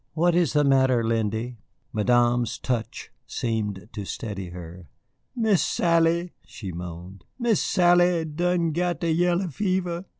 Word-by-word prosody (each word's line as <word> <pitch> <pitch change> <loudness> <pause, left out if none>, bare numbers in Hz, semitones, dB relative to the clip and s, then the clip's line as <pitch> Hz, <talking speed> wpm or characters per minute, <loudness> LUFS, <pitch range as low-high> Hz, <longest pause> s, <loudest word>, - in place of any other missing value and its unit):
"What 170 +2 +2
is 170 -4 +2
the 150 -1 +3
matter, 130 -3 +3
Lindy?" 115 +1 -2 0.3
Madame's 120 +1 +2
touch 120 -3 -4 0.2
seemed 105 -5 -3
to 105 - -5
steady 100 -2 -5
her. 85 0 -10 0.5
"Miss 220 -6 +2
Sally," 170 +1 +1
she 95 -4 -8
moaned, 90 +1 -8
"Miss 235 -4 +1
Sally 175 -2 +3
done 170 +2 0
got 175 0 -1
de 170 -2 0
yaller 175 +2 +1
fever." 180 +1 -2
145 Hz, 130 wpm, -25 LUFS, 110-175 Hz, 0.5 s, the